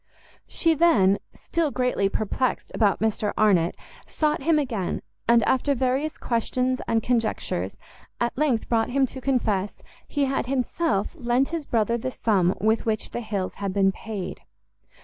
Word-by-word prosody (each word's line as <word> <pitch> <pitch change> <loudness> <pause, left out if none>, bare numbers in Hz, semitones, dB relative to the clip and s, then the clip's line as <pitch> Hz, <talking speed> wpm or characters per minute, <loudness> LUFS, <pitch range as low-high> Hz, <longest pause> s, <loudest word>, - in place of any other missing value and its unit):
She 330 -1 +2
then, 220 - +4 0.2
still 330 -3 -1
greatly 250 -7 0
perplexed 225 +5 -1
about 205 -4 +2
Mr 215 -1 0
Arnott, 185 -6 +3 0.3
sought 305 -1 0
him 315 +3 +3
again, 235 -10 -2 0.2
and, 235 -1 +5
after 275 +5 +2
various 265 +4 0
questions 255 +2 -1
and 225 -1 +1
conjectures, 220 - -1 0.4
at 240 0 0
length 265 -6 +1
brought 225 -1 +1
him 270 +2 +2
to 260 +1 -8
confess 215 -7 0 0.3
he 285 -2 0
had 265 -2 -1
himself 255 -4 0
lent 255 -3 +1
his 330 -3 -3
brother 230 0 +1
the 255 - -2
sum 195 -7 +1
with 220 +4 +1
which 215 -1 -1
the 240 - -3
Hills 200 -5 -3
had 195 -1 -3
been 195 -1 +4
paid. 195 -2 -6
235 Hz, 150 wpm, -25 LUFS, 210-265 Hz, 0.4 s, and